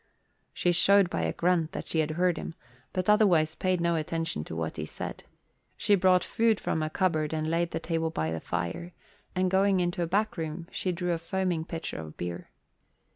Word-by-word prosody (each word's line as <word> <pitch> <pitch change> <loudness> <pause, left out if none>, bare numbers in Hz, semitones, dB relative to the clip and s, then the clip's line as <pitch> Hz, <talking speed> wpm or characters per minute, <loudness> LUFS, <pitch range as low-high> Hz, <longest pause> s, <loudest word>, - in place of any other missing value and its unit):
She 175 - +1
showed 195 +1 +4
by - - -1
a - - 0
grunt 170 -2 +1
that - - -5
she 160 - 0
had 155 -1 +1
heard 180 -1 +3
him 165 - -6 0.4
but 185 -1 -2
otherwise 180 -7 +4
paid 185 0 0
no 170 0 +2
attention 165 - -2
to 80 - -7
what 80 -1 -3
he - - -3
said. - - -6 0.5
She 205 0 +2
brought 185 -2 +5
food 225 -2 +2
from 160 - -1
a 155 - -1
cupboard 160 -4 0
and 155 0 -1
laid 170 0 +1
the - - -3
table 165 -1 -1
by 80 - -2
the 80 - -2
fire, 165 - -3 0.4
and 185 0 +1
going 195 0 +3
into 175 0 0
a 170 - 0
back 205 +4 0
room, 165 +1 -4
she 185 - -1
drew 180 0 -2
a 165 - -2
foaming 175 -1 -1
pitcher 165 - -5
of 80 -1 -9
beer. 85 0 -5
170 Hz, 205 wpm, -28 LUFS, 160-185 Hz, 0.5 s, brought